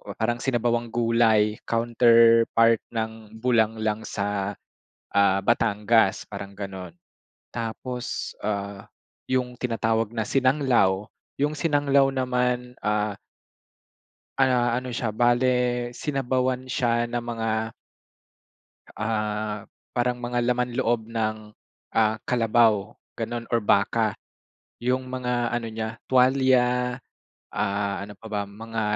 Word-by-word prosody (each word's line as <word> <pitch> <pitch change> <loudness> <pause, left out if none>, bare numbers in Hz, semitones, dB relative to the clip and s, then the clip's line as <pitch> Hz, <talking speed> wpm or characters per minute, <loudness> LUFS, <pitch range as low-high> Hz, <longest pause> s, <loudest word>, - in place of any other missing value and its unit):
parang 120 +2 -1
sinabawang 120 -2 0
gulay 115 -2 +2
counterpart 115 -1 +4 0.2
ng 110 -1 -4
bulanglang 110 -2 +1
sa, 100 0 -2 0.6
ah, 100 -1 +4
Batangas, 105 0 +2
parang 100 -1 -7
gano'n. 95 -3 -7 0.6
Tapos, 120 +2 -4
ah, 100 -1 -4 0.4
yung 125 -1 0
tinatawag 115 -2 0
na 110 -2 -3
sinanglaw, 130 -8 +2 0.3
yung 145 +2 +1
sinanglaw 145 -3 +3
naman, 125 -1 -1
ah 105 0 0 1.2
ah, 125 -3 +3
ano 125 +1 -3
siya, 115 -3 -3
bale 120 +2 +3 0.5
sinabawan 130 -2 -1
siya 120 -2 +1
na 120 0 -3
mga 115 -1 -2 1.2
Ah, 105 -1 -2 0.3
parang 125 0 0
mga 120 0 -1
laman 125 0 0
loob 115 -3 0
ng, 110 -1 -3 0.5
ah, 110 0 +2
kalabaw, 115 -4 +2 0.2
ganun 120 -1 -4
or 120 - +2
baka. 105 +1 +2 0.7
Yung 125 +2 0
mga 125 -1 -1
ano 120 -1 -2
niya, 110 0 -5
tuwalya, 125 -1 +3 0.6
ah, 100 0 -1
ano 105 0 -9
pa 110 - -13
ba? 105 -1 0
Mga 115 +2 -5
115 Hz, 105 wpm, -25 LUFS, 110-125 Hz, 1.2 s, counterpart